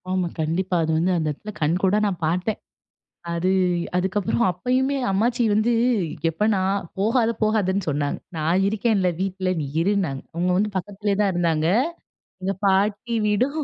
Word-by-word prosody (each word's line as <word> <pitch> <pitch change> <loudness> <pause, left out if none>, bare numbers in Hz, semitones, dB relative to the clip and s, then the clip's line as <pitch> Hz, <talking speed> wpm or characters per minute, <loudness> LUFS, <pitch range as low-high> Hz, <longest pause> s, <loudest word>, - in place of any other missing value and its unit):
ஆமா 185 -1 0
கண்டிப்பா 180 +4 0
அது 160 - 0
வந்து 175 +3 +2
அந்த 160 -2 -1
இடத்துல 210 +9 -8
கண்கூடா 185 +6 +2
நான் 180 -4 -4
பார்த்தேன். 180 +6 -1 0.7
அது, 170 +2 0 0.5
அதுக்கப்புறம் 190 +5 0
அப்பயுமே 255 +9 0
அம்மாச்சி 235 +6 +1
வந்து 215 +3 +2 0.6
எப்போ 165 +6 -1
நான் 195 0 0
"போகாத 225 +3 +2
போகாதன்னு 200 -3 +1
சொன்ன. 145 -1 0 0.3
நான் 165 +4 +1
இருக்கேன்ல 210 -3 +1
வீட்ல 190 -1 -1
நீ 145 - -3 0.2
இருன்னாங்க." 185 -8 0
அவங்க 175 +2 0
வந்து 210 +3 +1
பக்கத்திலேயே 200 +2 -2
தான் 200 -2 +2
இருந்தாங்க 165 -3 +1 0.8
எங்க 195 +1 0
பாட்டி 205 +4 +1
வீடும் 250 +9 +1
190 Hz, 140 wpm, -23 LUFS, 175-210 Hz, 0.8 s, வந்து